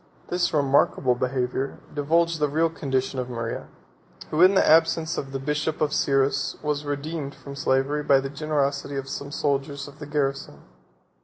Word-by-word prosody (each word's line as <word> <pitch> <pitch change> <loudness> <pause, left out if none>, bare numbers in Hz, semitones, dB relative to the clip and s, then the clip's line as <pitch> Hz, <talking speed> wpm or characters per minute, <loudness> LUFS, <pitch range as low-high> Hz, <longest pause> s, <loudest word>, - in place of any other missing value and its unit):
This 180 0 +1
remarkable 140 -3 +3
behavior 130 +1 -2 0.2
divulged 165 +3 +1
the 150 - +2
real 160 +3 +1
condition 135 -4 -2
of 125 0 -3
Maria, 115 -1 -4 0.6
who, 155 - +1
in 185 +2 +7
the - - +4
absence 160 0 +4
of 135 -1 -4
the 135 - -2
bishop 150 +3 -2
of 150 -1 +1
Cyrrhus, 135 0 +1
was 150 -1 -1
redeemed 145 0 -4
from 140 0 -10
slavery 140 +1 +1
by 140 -2 +4
the 135 - -3
generosity 140 -1 -1
of 135 0 -4
some 140 +1 -5
soldiers 140 -1 -1
of 145 +1 -14
the 150 - -7
garrison. 140 -2 -2
140 Hz, 165 wpm, -25 LUFS, 135-155 Hz, 0.6 s, in